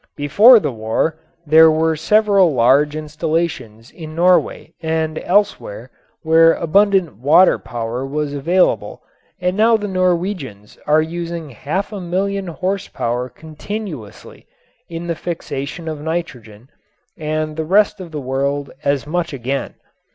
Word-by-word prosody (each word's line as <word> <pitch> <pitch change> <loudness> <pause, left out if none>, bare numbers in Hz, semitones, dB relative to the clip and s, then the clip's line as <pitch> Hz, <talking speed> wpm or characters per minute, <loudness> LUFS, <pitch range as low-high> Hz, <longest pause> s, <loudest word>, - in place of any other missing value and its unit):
Before 205 - +6
the 150 -8 -2
war 115 +8 -2 0.3
there 160 +2 +7
were 160 +1 +1
several 200 -2 +3
large 140 +5 +3
installations 150 -7 -3
in 155 -2 -10
Norway 180 +2 +1
and 160 -1 -2
elsewhere 210 - -1 0.3
where 165 +1 +5
abundant 190 - +2
water 150 +10 +4
power 120 +2 -5
was 145 +1 -3
available 170 +6 0 0.4
and 180 0 -1
now 225 +2 +4
the 210 -1 -5
Norwegians 180 - -2
are 155 +1 +4
using 170 -2 -6
half 155 - -4
a 200 - -5
million 195 +2 -2
horse 185 +3 -3
power 125 +2 -3
continuously 160 - -9 0.4
in 165 0 -6
the 170 - -1
fixation 165 -1 -6
of 155 -2 -5
nitrogen 135 -8 -6 0.4
and 155 -1 -3
the 160 - -2
rest 205 +5 +2
of 180 - -8
the 150 -2 -6
world 140 +2 -2
as 140 -1 0
much 165 +1 -2
again. 135 +1 -4
160 Hz, 130 wpm, -18 LUFS, 140-180 Hz, 0.4 s, there